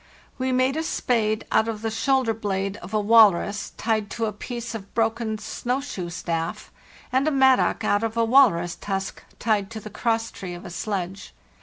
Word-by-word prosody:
We 260 0 0
made 255 +3 +2
a - - +1
spade 220 -8 0
out 220 - +3
of 220 -1 -4
the 225 - -1
shoulder 255 +1 +1
blade 195 -2 -2
of 175 - -10
a 215 - +1
walrus 210 -2 +4
tied 220 -2 0
to 230 - -2
a 215 - -2
piece 235 +2 -6
of 225 - -4
a - - -18
broken 225 0 -1
snow 245 +4 -2
shoe 195 -11 -5
staff, 165 0 -4 0.4
and 265 +3 +2
a - - +3
mattock 265 -2 +3
out 205 +2 +2
of 225 0 -2
a 230 - +3
walrus 225 -9 +4
tusk 195 -1 -4 0.2
tied 210 -3 0
to 225 - -6
the 215 0 -10
crosstree 225 -5 -2
of 175 - -11
a 180 - -7
sledge. 190 0 -4
220 Hz, 190 wpm, -24 LUFS, 195-235 Hz, 0.4 s, walrus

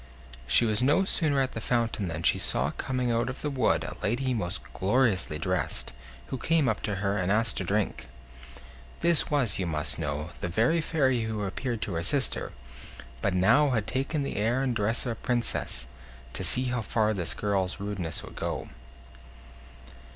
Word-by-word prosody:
She 70 - +6
was 110 0 +1
no 145 +9 +3
sooner 150 -7 +2
at 130 - 0
the 110 - -6
fountain 115 -4 0
than 85 0 -4
she - - +3
saw - - +1
coming 125 -2 -2
out 115 +2 0
of 130 - -6
the 150 - -1
wood 130 -4 +1
a - - -6
lady 125 +4 0
most 90 -7 -2
gloriously 100 -6 +2
dressed, 90 -5 0 0.4
who 130 - -4
came 160 -2 +2
up 110 - 0
to 100 - -1
her, 100 +1 +1
and 90 +1 0
asked 110 +1 +2
to - - -1
drink. 100 +3 -1 0.9
This 170 -1 +3
was, 130 -10 +1
you 90 - -1
must 75 -2 +1
know, 75 +4 -3
the - - -3
very 115 - +2
fairy 135 -6 +1
who 110 -2 -3
appeared 115 +4 -3
to 100 - -4
her 85 0 -2
sister, 135 - 0 0.7
but 100 - 0
now 115 +11 +4
had 115 -5 0
taken 135 +5 -1
the 140 - -4
air 120 +6 +1
and 125 -3 0
dress 110 +3 0
of 120 - -1
a - - -1
princess, 120 - -1 0.5
to - - -4
see 125 +8 +3
how 125 - 0
far 110 0 +1
this 90 -5 -1
girl's 100 -2 -1
rudeness 100 -5 -3
would - - -11
go. - - -4
110 Hz, 185 wpm, -28 LUFS, 95-130 Hz, 0.9 s, She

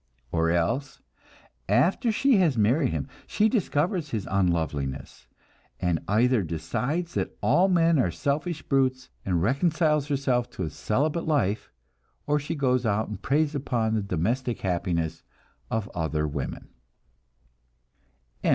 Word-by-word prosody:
Or 80 0 +1
else, 85 +12 0 0.7
after 170 - +3
she 260 +2 +3
has 165 -9 +3
married 120 +8 +3
him 80 -4 -3 0.2
she 215 - +2
discovers 175 - 0
his 110 -7 -3
unloveliness, 80 -8 -1 0.5
and 90 -3 +1
either 115 +3 +3
decides 125 - -2
that - - -3
all 185 +2 +4
men 170 -4 +3
are 120 - +2
selfish 150 - -2
brutes, 130 -1 0
and 90 -3 0
reconciles 150 - +2
herself 135 -4 0
to 95 - -4
a 80 - -3
celibate 150 - -1
life, 115 -9 0 0.5
or 150 0 +2
else - - -2
she 145 - -4
goes 130 -3 +1
out 110 -1 0
and 105 -2 -6
preys 150 +2 +1
upon 120 -6 -1
the 110 - +1
domestic 115 +7 -1
happiness 85 -3 -1 0.5
of 110 -2 -1
other 80 -2 -1
women. 70 -1 -5
125 Hz, 135 wpm, -26 LUFS, 90-150 Hz, 0.7 s, all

